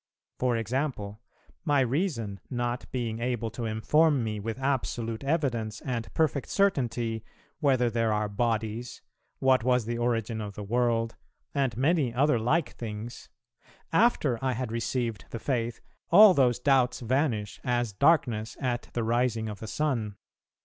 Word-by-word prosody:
For 125 -2 +1
example: 115 -3 -2 0.4
my 145 -4 +3
reason 125 - -1
not 120 0 -3
being 115 -3 -2
able 120 -2 -2
to 115 +1 -5
inform 140 +6 +2
me 105 -1 -3
with 110 +3 -4
absolute 125 -4 -2
evidence, 125 -8 -1
and 120 -3 -4
perfect 150 -4 +1
certainty, 120 - 0 0.4
whether 130 -4 +3
there 115 -1 +1
are 105 0 0
bodies, 110 +2 -2 0.3
what 130 -2 +3
was 125 -2 +2
the 120 +1 -3
origin 115 -2 -1
of 100 -2 -6
the 105 - -6
world, 115 +1 0 0.4
and 135 -6 0
many 140 -1 +2
other 140 -1 +3
like 145 +8 +1
things, 115 +1 -7 0.6
after 155 - +3
I 130 -1 +1
had 125 -1 -3
received 115 -1 -2
the - - -5
Faith, 120 -2 -2 0.3
all 205 +2 +9
those 125 -6 +3
doubts 130 -2 +2
vanish, 120 -4 0
as 120 -4 0
darkness 120 -4 +2
at 125 -2 -2
the 120 - -1
rising 115 -1 +1
of 105 -2 -6
the 110 - -7
sun. 115 -8 -1
120 Hz, 145 wpm, -28 LUFS, 110-135 Hz, 0.6 s, all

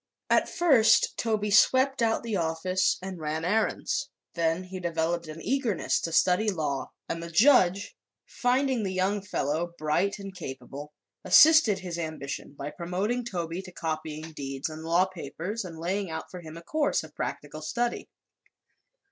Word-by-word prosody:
At - - +3
first 280 -11 +4
Toby 215 -2 -1
swept 260 +6 +4
out 225 0 +1
the 230 -3 -2
office 180 +2 +1
and 190 -2 -6
ran 155 +1 -3
errands. 215 +5 0 0.2
Then 165 +1 0
he 185 0 -7
developed 170 -1 -1
an 155 +1 -8
eagerness 245 -6 0
to 165 - -3
study 180 +6 +3
law, 150 -8 -2 0.2
and 165 - -3
the 170 - -6
judge, 195 - +4 0.3
finding 255 0 +1
the 195 -3 -2
young 195 +2 +1
fellow 170 -3 -2
bright 175 +7 0
and 195 -2 -8
capable, 140 -2 -8 0.3
assisted 310 -10 +7
his 180 -2 -5
ambition 155 -4 -5
by 145 +2 -5
promoting 190 +8 -2
Toby 175 -5 -4
to 185 -1 -11
copying 155 -1 -4
deeds 135 0 -4
and 155 0 -8
law 170 +3 +3
papers 185 +4 -5
and 170 -3 -8
laying 185 +3 -2
out 160 - -6
for 180 - -7
him 160 0 -10
a 170 - -10
course 295 - 0
of 155 -1 -12
practical 150 +1 -5
study. 235 +9 -2
180 Hz, 155 wpm, -27 LUFS, 160-210 Hz, 0.3 s, assisted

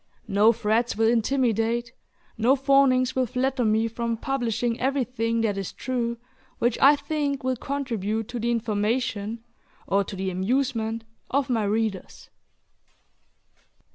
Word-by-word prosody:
No 205 +3 +5
threats 230 +1 0
will 225 +1 +2
intimidate, 235 -1 +1 0.4
no 240 +5 +3
fawnings 270 -2 +3
will 260 -1 +1
flatter 255 +2 0
me 220 +1 +2
from 230 0 -3
publishing 240 -3 -1
everything 250 -4 0
that 205 -3 0
is 195 - -4
true 235 -2 -2 0.4
which 240 0 +1
I 285 +2 +8
think 285 -2 -2
will 260 0 0
contribute 225 -6 -3
to 245 -1 -4
the 235 +1 -1
information 225 0 -1 0.4
or 200 +1 +2
to 195 - -7
the 190 0 -2
amusement 225 +3 -1 0.3
of 275 -1 0
my 225 -3 +1
readers. 215 -1 -3
235 Hz, 130 wpm, -25 LUFS, 220-255 Hz, 0.4 s, I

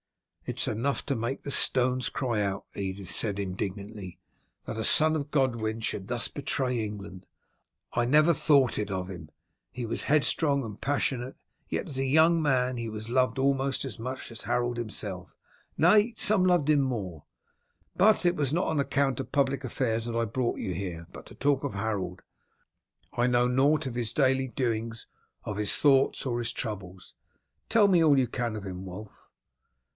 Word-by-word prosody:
"It - - -4
is - - +1
enough 120 +6 -1
to 140 - -1
make 120 +3 -3
the 140 - -4
stones 130 -1 +3
cry 120 -5 -1
out," 100 -1 -2
Edith 95 -1 -4
said 100 -3 +2
indignantly, 100 0 -5 0.5
"that - - -5
a 110 - -3
son 155 +6 +5
of 145 -2 -3
Godwin 115 -6 0
should 100 -3 -4
thus 120 -1 0
betray 130 -4 -2
England. 100 -3 -7 0.7
I 120 - +1
never 155 +6 +5
thought 140 -4 +3
it 105 -1 -2
of 95 -1 -3
him. 85 -5 -9 0.4
He 125 - -5
was 115 - -2
headstrong 145 -1 +2
and 105 -1 -9
passionate; 135 -2 -1 0.3
yet - - -2
as 135 - -6
a - - +1
young 160 +5 +4
man 130 -4 +1
he 115 -1 -4
was 110 +1 -6
loved 130 -2 +2
almost 135 0 0
as 120 -7 -6
much 130 +1 -6
as 115 - -7
Harold 120 0 -1
himself, 105 -5 -6 0.4
nay, 210 +7 +5
some 210 -3 +4
loved 175 -5 +3
him 150 -2 +5
more. 100 - -3 0.7
But 215 -2 +4
it 175 0 +3
was 145 -5 -1
not 175 +4 +1
on 160 -2 0
account 140 -2 0
of 125 - -5
public 140 -1 +1
affairs 115 -2 -1
that 120 -1 -4
I 115 - +1
brought 120 +2 -1
you 95 -4 -3
here, 85 -2 -5
but - - -11
to - - -13
talk 140 0 +1
of 140 -7 -3
Harold. 100 -4 -3 0.9
I 120 +1 +1
know 120 0 +3
nought 140 +5 +2
of 130 -3 -4
his 120 -2 -2
daily 130 -2 +2
doings, 115 -3 -3 0.4
of 105 - -4
his 105 -1 0
thoughts, 135 -2 +3
or 120 -2 -1
his 120 -1 -2
troubles. 95 -7 -6 0.6
Tell 220 -2 +5
me 180 -4 +4
all 150 -3 +5
you 130 - +2
can 120 -2 -3
of 105 -2 -6
him, 95 -1 -6
Wulf." 95 +3 -10
120 Hz, 180 wpm, -28 LUFS, 105-140 Hz, 0.9 s, son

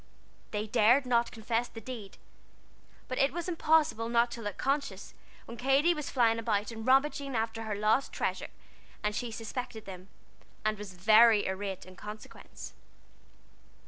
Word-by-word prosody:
They 210 0 -2
dared 230 +5 +4
not 240 -1 +2
confess 230 +2 -1
the 225 - -10
deed, 225 -3 -8 0.9
but 255 - -3
it 275 - +3
was 345 +2 -4
impossible 315 -8 +2
not 235 0 +3
to 235 - -6
look 205 -2 -5
conscious 275 -8 -2 0.3
when 235 - -9
Katy 275 +7 +3
was 300 -3 -5
flying 230 -3 +3
about 215 -1 -1
and 225 0 -7
rummaging 275 0 +2
after 225 0 -2
her 215 -1 -2
lost 215 +6 +1
treasure, - - -2 0.5
and 210 0 0
she 245 - -2
suspected 225 +1 -6
them, 185 -1 -9 0.6
and 215 -1 0
was 200 -3 -8
very 215 +3 +6
irate 190 0 -4
in 185 0 -13
consequence. 210 +2 -10
230 Hz, 150 wpm, -30 LUFS, 210-255 Hz, 0.9 s, very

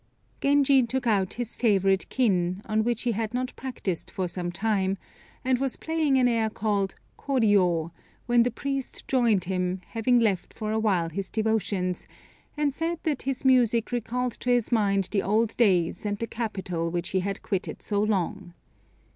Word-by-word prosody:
Genji 280 -1 +4
took 250 +2 -2
out 200 -5 +1
his 245 -1 -4
favorite 195 -4 +2
kin, 185 -6 +1
on 215 0 +1
which 235 0 -1
he 245 - +1
had 225 +1 -2
not 255 0 -2
practised 220 -9 -4
for 185 -1 -2
some 175 0 -3
time, 195 0 0 0.5
and 255 -1 +2
was 270 -1 -1
playing 315 -4 +1
an 250 -1 +4
air 225 -2 +1
called 205 -3 -1 0.2
"Kôriô," 195 - +2 0.3
when 240 0 +4
the 240 - +3
priest 275 +2 -4
joined 235 -8 +3
him, 185 0 -1
having 240 +2 +2
left 205 -6 0
for 215 -1 -3
awhile 205 -6 +1
his 190 +3 -4
devotions, 200 -5 -1 0.5
and 295 -2 +1
said 330 +3 -2
that 300 -4 -1
his 270 0 -3
music 240 -3 +4
recalled 245 +1 -1
to 250 - -5
his 245 -2 +2
mind 200 -4 +2
the 200 - +1
old 220 +2 +1
days 180 -7 +2
and 205 -1 -2
the 230 - -2
capital 190 -7 -3
which 175 0 -3
he 190 - +1
had 195 +1 -3
quitted 195 -2 -3
so 205 -1 0
long. 195 -3 -1
220 Hz, 170 wpm, -26 LUFS, 190-245 Hz, 0.5 s, Genji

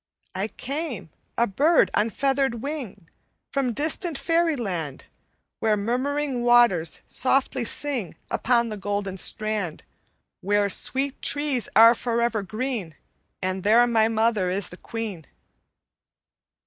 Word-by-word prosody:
"'I 195 +3 -2
came, 275 - -5 0.3
a 235 - +4
bird 290 - +3
on 220 - +2
feathered 270 -2 0
wing, 255 - -6 0.4
From 270 -3 0
distant 310 - 0
Faeryland 240 - -1 0.6
Where 215 -1 +2
murmuring 255 +5 -1
waters 240 -9 +3
softly 265 -1 +1
sing 240 - -2 0.2
Upon 235 -1 +1
the 215 - -5
golden 200 -1 -3
strand, 210 -4 -2 0.6
Where 205 +1 +1
sweet 270 +7 +1
trees 285 -4 0
are 230 +2 +9
forever 235 -2 -1
green; 215 - -4 0.5
And 185 0 -2
there 225 +5 +5
my 225 -2 +3
mother 220 -4 +1
is 190 +1 -2
the 180 - -11
queen.' 215 -9 -6
230 Hz, 115 wpm, -24 LUFS, 200-270 Hz, 0.6 s, are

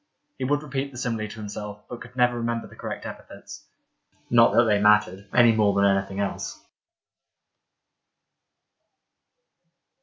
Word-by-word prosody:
He 130 - -2
would 145 +2 0
repeat 140 -1 -4
the 125 - -11
simile 115 -4 -2
to 100 - -10
himself, 105 -1 -8
but 120 - -8
could 125 +1 -12
never 125 -1 +3
remember 115 0 -2
the - - -14
correct - - -6
epithets. - - -10 0.6
Not 115 -1 +5
that 120 - +6
they 105 -3 +2
mattered 105 -2 +3
— - - -33
any 120 -2 +6
more 105 -2 +2
than 100 0 +3
anything 95 0 0
else. 100 -1 -3
110 Hz, 145 wpm, -25 LUFS, 100-120 Hz, 0.6 s, that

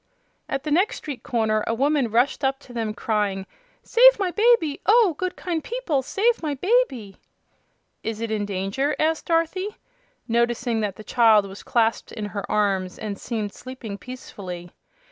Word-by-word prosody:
At 270 0 -2
the 305 - -3
next 370 +8 +2
street 285 -4 -7
corner 220 -3 0
a 230 - +1
woman 275 0 +2
rushed 245 +6 +1
up 270 0 +1
to 245 - -14
them 225 -2 -2
crying: 205 -3 -1 0.4
"Save - - +6
my 385 -3 0
baby! 420 -9 +3
Oh, 430 -4 +5
good, 370 +3 -3
kind 335 -4 -3
people, 445 - -1
save 450 - +1
my 300 -3 -2
baby!" 275 - 0 0.8
"Is 225 -1 -4
it 230 -1 -3
in 210 -2 -1
danger?" 200 +10 -1
asked 315 +1 0
Dorothy, 340 +5 0 0.5
noticing 235 0 +1
that 205 -3 -2
the 215 - -10
child 220 -2 +4
was 195 +1 -9
clasped 230 -1 0
in 215 - -4
her 200 0 -5
arms 195 -3 0
and 205 -2 -5
seemed 215 -4 -3
sleeping 240 -6 -8
peacefully. 185 -9 -8
245 Hz, 165 wpm, -24 LUFS, 210-320 Hz, 0.8 s, Save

